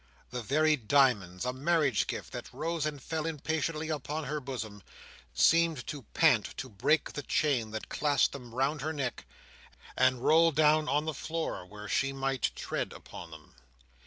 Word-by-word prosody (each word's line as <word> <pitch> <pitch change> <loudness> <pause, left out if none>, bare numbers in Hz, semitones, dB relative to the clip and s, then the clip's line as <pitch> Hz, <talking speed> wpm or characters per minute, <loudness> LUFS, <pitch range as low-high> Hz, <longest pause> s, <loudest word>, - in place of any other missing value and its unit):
The 125 0 -3
very 155 +6 +3
diamonds—a 120 -5 +2
marriage 145 - +2
gift—that - - -6
rose 165 -2 -2
and 150 -2 -4
fell 160 +4 -3
impatiently 155 0 -2
upon 155 +1 -3
her 150 +2 -2
bosom, 110 -7 -6 0.5
seemed 165 -5 +3
to 145 - -5
pant - - +3
to 130 - -5
break 125 +9 +1
the 145 - -4
chain 135 -5 +1
that 110 0 -6
clasped 145 -1 +2
them 120 -4 -9
round 135 +3 0
her 155 +3 -2
neck, 135 -5 -4 0.7
and 130 -1 +2
roll 165 +1 +6
down 155 0 +3
on 150 +1 +1
the 160 - -2
floor 160 - -4
where 105 +2 -9
she 135 +5 +1
might 135 -3 0
tread - - -3
upon 85 - -10
them. 80 -1 -13
140 Hz, 160 wpm, -30 LUFS, 125-155 Hz, 0.7 s, roll